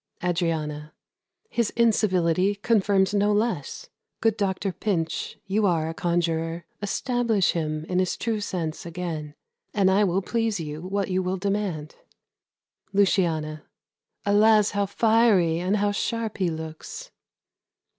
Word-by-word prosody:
Adriana. 160 -4 -2 0.5
His 235 - 0
incivility 195 -5 +2
confirms 200 -2 +2
no 205 0 +3
less. 210 - -2 0.3
Good 225 -2 +2
doctor 195 -2 -1
Pinch, 170 -5 -2
you 205 +1 +1
are 165 -3 +1
a - - -4
conjurer; 170 -1 -1 0.2
Establish 225 -1 +1
him 155 -2 -2
in 180 +1 0
his 185 -1 0
true 225 -2 -1
sense 170 -6 -3
again, 165 -3 -5 0.4
And 195 -2 +4
I 200 +2 +4
will 190 +1 0
please 225 -1 -1
you 155 -1 -5
what 195 +1 -2
you 185 0 +1
will 185 +1 -1
demand. 195 -6 -2 0.9
Luciana. 165 -6 +1 0.6
Alas! 210 +1 +5
how 200 -1 0
fiery 205 -6 +3
and 185 +4 +1
how 205 0 +1
sharp 220 +1 -2
he 185 -2 +2
looks! 160 - -7
190 Hz, 125 wpm, -25 LUFS, 165-210 Hz, 0.9 s, Alas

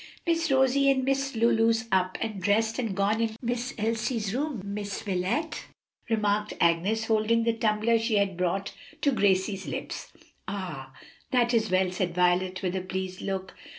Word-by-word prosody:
"Miss 335 -1 +1
Rosie 270 +1 +4
and 265 -1 +2
Miss 275 0 0
Lulu's 225 0 +3
up 185 -1 +1
and 215 -4 -3
dressed 220 +5 +1
and 225 -6 -2
gone 205 +3 +1
into 225 -1 -1
Miss 245 +1 -3
Elsie's 220 -1 -1
room, 280 -1 -2
Miss 205 +1 -5
Wilet," 200 - -1 0.4
remarked 210 -1 0
Agnes, 185 +7 +2
holding 225 +1 +2
the 230 0 +2
tumbler 225 +1 +2
she 225 0 0
had 200 -2 +2
brought 180 +2 -1 0.3
to 285 - +3
Gracie's 195 -3 +1
lips. - - -5 0.4
"Ah, 160 -10 -5 0.4
that 245 -1 +2
is 220 -2 +2
well," 185 0 +2
said 180 -1 -2
Violet, 180 +1 +2
with 180 0 -1
a 190 - -1
pleased 185 0 -4
look. 190 -1 -4
215 Hz, 160 wpm, -27 LUFS, 190-230 Hz, 0.4 s, Rosie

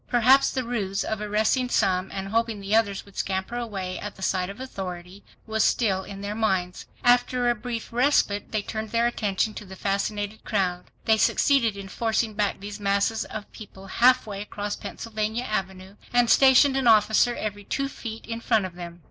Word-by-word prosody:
Perhaps 260 +3 +5
the 260 - -2
ruse 200 -5 -2
of 220 -1 -3
arresting 215 +5 +1
some, 190 -4 +1
and 195 0 -5
hoping 225 0 0
the 200 +2 -1
others 205 -3 +1
would 200 - -18
scamper 190 +4 -2
away 195 -6 -4
at 205 - -7
the 190 - -9
sight 185 -1 0
of 200 +4 -9
authority, 190 -6 -7 0.2
was 220 -1 0
still 195 -5 +2
in 195 0 -9
their 200 +1 -3
minds. 190 -5 -1 0.2
After 245 0 +3
a - - +2
brief 235 0 -6
respite 240 -5 +2
they 215 -2 -1
turned 220 0 -5
their 230 +1 +1
attention 215 -2 0
to - - -7
the 190 -1 -11
fascinated 205 +2 -2
crowd. 180 -4 -1 0.2
They 220 -1 +4
succeeded 230 -2 +3
in 195 -1 -7
forcing 225 +2 -1
back 205 -1 -1
these 205 +1 -7
masses 200 +2 +1
of 210 -1 -8
people 195 -2 -12
half 255 +6 +4
way 200 -2 -6
across 205 0 -4
Pennsylvania 220 +1 -4
Avenue, 190 -3 -4
and 245 -1 +3
stationed 270 +1 +6
an 265 -2 +1
officer 220 +2 +4
every 205 -1 -4
two 275 +7 -2
feet 225 -4 -8
in 230 0 -5
front 220 -4 +2
of 185 - -7
them. 175 -1 -9
210 Hz, 190 wpm, -25 LUFS, 195-235 Hz, 0.2 s, stationed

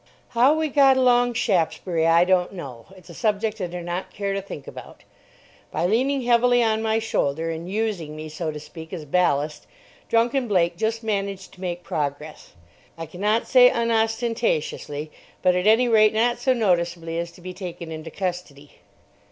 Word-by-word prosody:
How 250 +6 +4
we 315 0 0
got 270 -2 +5
along 245 -1 +3
Shaftesbury 170 -6 0
I 165 +1 +5
don't 185 0 +1
know. 135 -10 -9
It's 185 -1 -14
a - - -11
subject 215 +1 -1
I 180 - -1
do 175 +1 -6
not 175 +2 -5
care 200 -1 -3
to 195 - -2
think 170 -7 -9
about. - - -11 0.7
By - - -1
leaning 260 +7 +1
heavily 245 0 +4
on 220 -1 +1
my 220 0 +1
shoulder 165 -8 -1
and 165 +2 -6
using 200 -8 -2
me, 155 0 -7
so 155 +1 -4
to 150 -1 -5
speak, 160 +2 -11
as 165 -4 -6
ballast, 150 -2 0 0.4
drunken 240 +3 +2
Blake 175 -4 +2
just 225 +4 -2
managed 200 -3 -3
to 185 - -16
make 175 -1 -4
progress, 150 +1 -5 0.4
I 165 - -5
cannot 205 +8 -1
say 250 -1 +7
unostentatiously, 225 -10 -1 0.3
but 180 - +4
at 180 +2 0
any 225 +3 +5
rate 215 -2 +4
not 240 +2 +2
so 260 - +1
noticeably 170 -6 0
as 170 0 -4
to 180 - -16
be 185 +1 -7
taken 175 -3 -7
into 160 0 -7
custody. 175 -6 -6
185 Hz, 175 wpm, -23 LUFS, 165-225 Hz, 0.7 s, say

